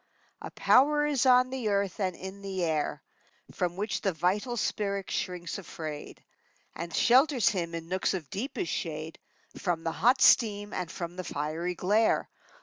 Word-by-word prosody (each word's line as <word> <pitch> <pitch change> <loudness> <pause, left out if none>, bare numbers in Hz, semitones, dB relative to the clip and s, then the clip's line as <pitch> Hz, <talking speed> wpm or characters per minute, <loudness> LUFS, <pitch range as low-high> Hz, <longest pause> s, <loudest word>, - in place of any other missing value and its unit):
A - - -6
power 295 +3 +4
is 280 -3 +1
on 255 0 +5
the 255 -5 -2
earth 200 -2 0
and 185 -3 -1
in 190 +1 -8
the 190 -2 -3
air 155 -3 -1 0.5
From 175 -1 -2
which 205 +3 -2
the 195 -3 0
vital 200 - 0
spirit 200 -3 -2
shrinks 180 0 -3
afraid, 155 -5 -8 0.5
And 170 +1 -5
shelters 255 - +4
him, 170 -4 -3
in 165 0 -6
nooks 185 +2 0
of 165 -6 -5
deepest 275 - -3
shade, 160 -2 -4 0.4
From 175 -4 -1
the 165 - -1
hot 245 - +3
steam 205 -5 +4
and 180 -3 -3
from 175 0 -6
the 185 - -3
fiery 160 +4 -3
glare. 210 +6 +2
190 Hz, 160 wpm, -29 LUFS, 170-225 Hz, 0.5 s, on